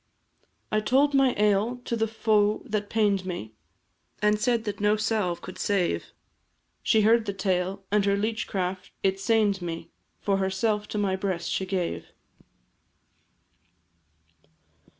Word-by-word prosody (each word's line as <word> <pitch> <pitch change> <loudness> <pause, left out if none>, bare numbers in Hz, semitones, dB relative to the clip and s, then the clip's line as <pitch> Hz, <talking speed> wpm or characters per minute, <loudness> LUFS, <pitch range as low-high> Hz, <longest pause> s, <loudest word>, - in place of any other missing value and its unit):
I 215 - +3
told 270 +7 +3
my 270 -2 +4
ail 210 +3 +2
to 235 - -1
the 225 -1 0
foe 215 -1 +1
that 210 -4 -2
pain'd 205 -3 +2
me, 175 - -6 0.7
And 210 0 +2
said 235 0 +1
that 205 -2 -4
no 210 +1 +3
salve 210 -5 -1
could - - -9
save; 180 - 0 0.8
She 220 - +3
heard 225 +1 +4
the 200 - -1
tale, 190 0 -1
and 210 -1 +3
her 200 0 +2
leech 215 +2 -1
craft 185 -1 -3
it 195 0 +1
sain'd 210 -2 +2
me, 165 -1 -5 0.3
For 195 -1 +1
herself 205 +2 0
to - - -4
my 200 -2 +1
breast 185 -3 -2
she 190 - -1
gave. 185 -2 -2
205 Hz, 140 wpm, -26 LUFS, 190-220 Hz, 0.8 s, my